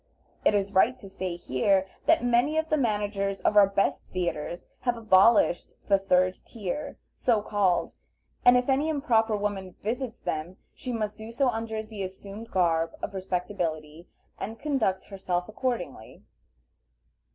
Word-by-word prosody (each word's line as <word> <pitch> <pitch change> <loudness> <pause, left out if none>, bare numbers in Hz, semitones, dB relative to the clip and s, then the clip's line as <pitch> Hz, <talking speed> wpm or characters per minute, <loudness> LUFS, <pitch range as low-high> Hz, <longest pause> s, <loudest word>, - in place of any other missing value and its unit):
It 210 - +4
is 200 0 0
right 230 +7 +4
to 205 - -12
say 190 -2 -4
here, 185 +6 +1 0.2
that 325 - +5
many 245 +6 +3
of 315 0 0
the - - +3
managers 205 -6 -1
of - - +2
our 205 -1 +8
best 195 0 +1
theatres 175 -2 -3
have 245 -2 0
abolished 215 -3 +4 0.2
the 195 -1 +5
third 185 -1 +2
tier, 235 +7 -5 0.2
so 225 -4 +1
called, 200 -4 +1 0.5
and 245 0 +7
if 250 - 0
any 280 +3 +2
improper 230 -8 +2
woman 200 -3 -3
visits 240 +2 -3
them 160 +4 -4 0.2
she 255 - -6
must 215 -3 -3
do 220 +1 -8
so 260 +2 +2
under 220 -1 -3
the 215 -2 -8
assumed 200 +4 -7
garb 165 -4 +1
of - - -3
respectability, 175 -4 -3 0.3
and 220 +3 -5
conduct 260 -11 0
herself 180 -3 -3
accordingly. 215 - -4
205 Hz, 150 wpm, -27 LUFS, 185-230 Hz, 0.5 s, our